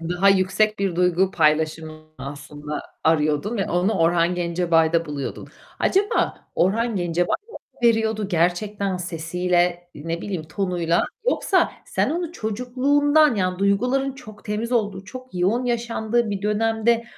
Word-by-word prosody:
Daha 175 +4 +1
yüksek 195 +3 +2
bir 195 -4 -1
duygu 180 +1 +2
paylaşımını 155 0 0 0.2
aslında 145 +2 -6 0.2
arıyordun 160 +7 +1
ve 195 - -2
onu 180 +5 +1
Orhan 170 -1 +2
Gencebay'da 170 -1 +2
buluyordun. 145 -2 -5 0.3
Acaba 400 +2 +1
Orhan 220 +5 +1
Gencebay 175 0 0 0.2
mı - - -8 0.3
veriyordu 220 -3 +2
gerçekten 190 +3 0
sesiyle, 175 +1 -1
ne 165 +3 -4
bileyim, 185 -6 -3
tonuyla 170 0 0 0.3
yoksa 370 -3 +1
sen - - 0
onu 340 0 -3
çocukluğundan, 275 - +2
yani 185 -2 -1
duyguların 250 +8 +1
çok 215 -7 -13
temiz 220 +3 -3
olduğu, 205 -5 0
çok 255 +2 -10
yoğun 200 +8 +1
yaşandığı 235 -1 0
bir 200 -1 -3
dönemde 225 +2 +1
190 Hz, 125 wpm, -23 LUFS, 170-225 Hz, 0.3 s, yüksek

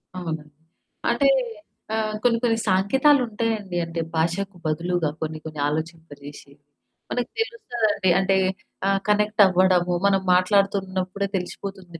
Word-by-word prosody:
అవును. 165 -4 -4 0.7
అంటే 240 +4 +3 0.7
ఆహ్, 215 -1 -1
కొన్ని, 235 -1 +3
కొన్ని 230 -2 +2
సాంకేతాలుంటాయండి. 225 -2 +2
అంటే 165 0 -5 0.2
భాషకు 180 +4 -1
బదులుగా 165 +1 0
కొన్ని, 155 0 -3
కొన్ని 155 -2 -7
ఆలోచింప 160 +2 -4
జేసి. 145 0 -11 0.6
మనకు 245 -1 -2
తెలుస్తదండి. 240 - 0
అంటే 190 0 +2 0.5
ఆహ్, 195 0 +2
కనెక్ట్ 210 0 +3
అవ్వడము, 180 -1 +3
మనం 195 -1 +2
మాట్లాడుతున్నప్పుడే 190 0 +1
తెలిసిపోతుంది, 180 -1 -7
190 Hz, 110 wpm, -23 LUFS, 170-215 Hz, 0.7 s, అంటే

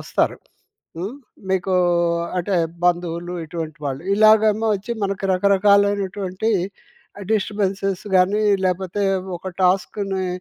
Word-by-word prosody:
వస్తారు. - - 0 0.6
హ్మ్. 195 +8 -4 0.4
మీకు 190 0 0 0.6
అంటే 185 +3 -1 0.3
బంధువులు 175 0 0
ఇటువంటి 160 -1 -6
వాళ్ళు 135 +1 -3
ఇలాగేమో 215 +1 +4
వచ్చి 205 +4 -4
మనకు 195 0 -2
రకరకాలైనటువంటి 200 +1 +2 0.8
డిస్టర్బెన్స్ 200 -2 -1 0.3
గాని 195 +4 +3 0.2
లేకపోతే 185 +2 -1 0.3
ఒక 180 +2 -7
టాస్క్‌ని 190 +1 0
195 Hz, 90 wpm, -21 LUFS, 180-205 Hz, 0.8 s, ఇలాగేమో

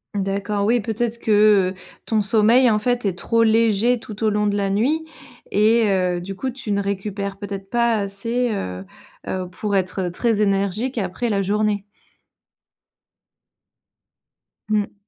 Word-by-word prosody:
D'accord, 200 +1 -1
oui, 235 +3 +3
peut-être 225 +2 -2
que, 210 -4 +4
heu, - - -8 0.3
ton 220 -2 +1
sommeil, 225 +5 +4
en 215 - +3
fait, 245 +2 0
est 185 -2 -1
trop 230 +2 +1
léger 225 +1 +3
tout 220 -1 -8
au 215 - +4
long 210 0 0
de 205 0 +1
la 200 -1 0
nuit 275 +11 +1 0.4
et 220 +1 +3
heu, 180 -2 +1
du 195 +2 -6
coup, 260 +5 -3
tu 245 -4 -6
ne 200 0 0
récupères 200 0 -3
peut-être 195 -1 -6
pas 235 -1 +2
assez, 225 +4 -2
heu, 95 - -5 0.4
heu, 185 -1 -3
pour 205 +3 -3
être 185 -1 -1
très 225 +4 0
énergique 200 +5 0
après, 205 +5 -2
la 200 - +1
journée. 205 +1 0 2.9
Mmh. 210 -1 0
210 Hz, 150 wpm, -21 LUFS, 195-230 Hz, 2.9 s, que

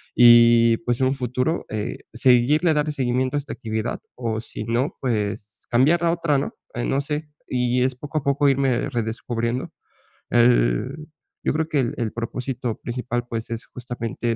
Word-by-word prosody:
y, 115 -1 +7
pues, 120 +1 -1
en - - +4
un 130 - +1
futuro, 130 +4 -1
eh, 110 +2 -4
seguirle 130 +7 +4
darle 150 0 +1
seguimiento 130 0 0
a - - +2
esta 145 - -6
actividad 110 -3 -3 0.2
o, 115 -3 -2
si 110 - -7
no, 120 +5 0
pues 105 -4 -3
cambiarla 155 +8 +3
a - - +4
otra, 165 -4 +1
¿no?, 140 - -4 0.2
eh, 120 - -2
no 135 +1 +1
sé. 150 +1 -4 0.2
Y 125 0 +1
es 130 +1 +1
poco 145 +4 -5
a - - -12
poco 140 0 +3
irme 135 -2 +1
redescubriendo, 115 0 -2 0.6
el 120 - +2 0.4
yo - - +1
creo 160 0 -1
que 150 - +1
el 120 -3 0
el 115 -3 -2
propósito 120 0 -4
principal, 120 0 -3
pues, 115 0 -4
es 115 0 -4
justamente 120 -2 -4
125 Hz, 170 wpm, -23 LUFS, 115-135 Hz, 0.6 s, y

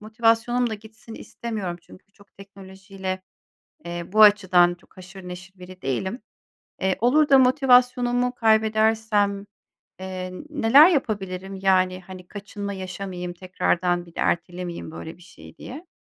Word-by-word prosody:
motivasyonum 230 +2 +1
da - - -2
gitsin 220 +1 -13
istemiyorum. 210 -9 -6
Çünkü 200 - -18
çok 200 -1 -23
teknolojiyle, 190 -1 -8 0.6
eee, 170 0 -5
bu 215 - +4
açıdan 185 -4 +5
çok 175 - -27
haşır 185 0 -12
neşir 180 +1 -10
biri 185 0 -12
değilim. 190 - -3 0.6
Eee, 190 0 0
olur 295 +6 +3
da 275 - +7
motivasyonumu 250 -1 +3
kaybedersem, 220 -2 +1 0.5
eee, 185 -1 -6 0.2
neler 290 +2 +6
yapabilirim? 195 - -3
Yani, 185 -1 +2
hani, 185 -1 -11
kaçınma 205 0 -7
yaşamayayım 185 -1 -6
tekrardan, 175 -1 -1
bir 170 - -18
de - - -8
ertelemeyeyim 175 -1 -3
böyle 160 +1 -9
bir - - -21
şeyi 175 - -16
diye. 310 +8 -10
195 Hz, 130 wpm, -23 LUFS, 185-225 Hz, 0.6 s, da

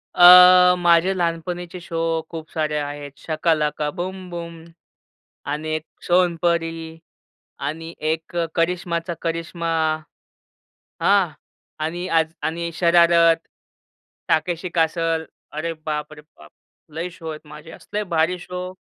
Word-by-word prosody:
अ, 180 0 +9
माझे 175 +1 +4
लहानपणीचे 175 +1 -3
शो 165 -1 -5 0.3
खूप 160 -1 -8
सारे 155 -1 -1
आहेत. 145 -1 -5
शाका 160 +2 0
लाका 150 0 -1
बूम 185 +1 -5
बूम 170 -1 -7 0.9
आणि 155 +1 -4
एक 155 - -7 0.2
सोनपरी 165 -2 0 0.6
आणि 160 +4 -5 0.2
एक 160 +2 -4 0.2
करिश्माचा 170 0 -1
करिश्मा. 165 0 -3 1.3
हां. - - +4 0.6
आणि 175 +3 -3
आज 160 -1 +2
आणि 170 +1 -2
शरारत, 170 -1 +5 0.9
ताकेशी 170 +2 0
कॅसल. 165 0 +1 0.3
अरे 155 +2 -3
बाप 150 0 -3
रे 150 - -11
बाप! 150 - -19 0.4
लई 170 +3 -3
शो 170 -2 -9
आहेत 155 0 -9
माझे, 150 +2 -12
असले 210 +5 -5
भारी 170 0 0
शो 180 +1 -6
165 Hz, 115 wpm, -22 LUFS, 160-175 Hz, 1.3 s, अ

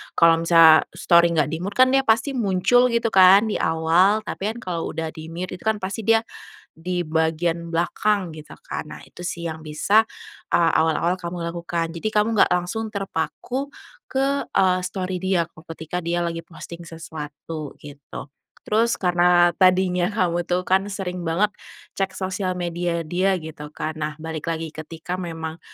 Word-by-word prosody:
kalau 165 0 +5
misalnya 165 -2 +7
story 170 -1 +4
nggak 150 -1 +1
di-mute 180 +5 -4
kan 255 +2 +5
dia 270 - +4
pasti 225 +5 +3
muncul 235 +1 +3
gitu 235 -1 0
kan 195 +3 +6
di - - -1
awal 170 +7 +3
tapi 200 - -4
kan - - -8
kalau 170 -3 -3
udah 160 -1 -3
di-mute 170 +3 -7
itu - - -17
kan 220 - +3
pasti 200 +1 -5
dia 225 0 +4 0.5
di 175 +2 -3
bagian 165 +1 0
belakang 180 +1 0
gitu 155 -1 -11
kan. - - -6
Nah - - -8
itu 175 - -12
sih 170 -1 -4
yang 160 -1 -7
bisa 180 +8 +3 0.5
a - - +4 0.2
awal-awal 165 +3 +1
kamu 175 -1 -6
lakukan 170 0 -3
jadi 215 +6 -2
kamu 215 +1 +1
nggak - - +5
langsung 195 +5 -1
terpaku 215 - -4 0.4
ke 275 +1 +1
e 190 - +3 0.2
story 185 0 -3
dia 185 -3 +1
ko 155 - -17
ketika 165 +2 -5
dia 170 +1 -1
lagi 165 0 -3
posting 170 0 -10
sesuatu 155 -2 -8
gitu, 145 -1 -10 0.4
terus 230 +2 +2
karena 175 -1 +4
tadinya 185 -1 +3
kamu 175 -4 0
tuh 180 +1 0
kan 190 +1 +3
sering 180 -2 -4
banget 180 +6 +2 0.5
cek 195 -1 0
sosial 185 0 -2
media 175 -1 -2
dia 185 +2 +1
gitu 150 -2 -9
kan, 155 +1 -4
nah 150 0 -2
balik 160 +1 -4
lagi 165 0 -3
ketika 165 +3 -6
memang 165 -2 -6
175 Hz, 165 wpm, -23 LUFS, 165-195 Hz, 0.5 s, misalnya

